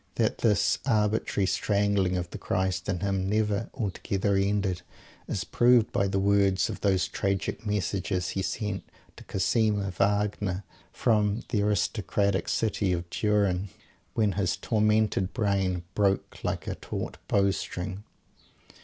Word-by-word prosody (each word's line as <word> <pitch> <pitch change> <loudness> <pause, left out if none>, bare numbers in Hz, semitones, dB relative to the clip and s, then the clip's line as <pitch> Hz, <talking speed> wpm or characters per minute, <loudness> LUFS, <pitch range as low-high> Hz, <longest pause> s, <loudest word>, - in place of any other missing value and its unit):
That - - +1
this 105 -4 +2
arbitrary 105 -4 +1
strangling 100 -2 +1
of 90 -1 -3
the - - -7
Christ 95 -1 -1
in 90 -3 -1
him 95 -1 0
never 105 +1 0
altogether 100 -3 -1
ended, 95 -2 +1 0.5
is 95 - -2
proved 120 -2 +4
by 100 - +1
the 95 - -1
words 100 -1 +3
of - - -8
those 95 -2 +2
tragic 100 +2 -2
messages 100 -2 -1
he 95 - -2
sent 105 +1 -2 0.4
to - - -11
Cosima 105 -1 +1
Wagner 100 -1 0 0.3
from 105 -2 +1
"the 105 - +1
aristocratic 100 -1 0
city 100 -4 +1
of 85 0 -3
Turin" 100 -3 +1 0.5
when 105 -3 +2
his 95 -2 0
tormented 105 -3 +1
brain 100 -5 0
broke 100 -2 0
like - - -2
a - - -2
taut - - -5
bow 100 -1 +3
string. 95 +1 -5
100 Hz, 135 wpm, -28 LUFS, 95-105 Hz, 0.5 s, proved